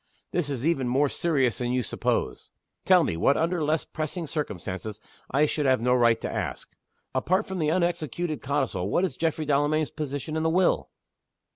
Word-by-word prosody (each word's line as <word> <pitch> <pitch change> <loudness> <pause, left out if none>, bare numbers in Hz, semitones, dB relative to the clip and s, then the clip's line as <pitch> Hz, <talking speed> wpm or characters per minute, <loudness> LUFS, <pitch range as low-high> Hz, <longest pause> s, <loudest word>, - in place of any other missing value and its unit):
This 170 -5 -1
is 135 -1 -3
even 140 -6 +1
more 135 +4 +2
serious 135 - +1
than 120 0 -1
you 125 -1 +1
suppose. - - -2 0.4
Tell - - +6
me, - - -1
what 135 +12 +3
under 165 0 0
less 155 +2 0
pressing 160 +2 -4
circumstances 105 - -4 0.3
I 145 +3 +3
should 150 -1 0
have 130 -1 +4
no 125 +2 +2
right 120 -2 +4
to - - -3
ask. - - -4 0.4
Apart 185 +4 +1
from 190 -1 -5
the 155 -2 +1
unexecuted 170 -2 -1
codicil 130 -10 -1
what 180 - +2
is 185 - -4
Geoffrey 160 -1 -1
Delamayn's 150 +1 +1
position 150 +1 -4
in 160 - 0
the 160 - +2
will?" 180 +2 +2
145 Hz, 180 wpm, -26 LUFS, 125-160 Hz, 0.4 s, Tell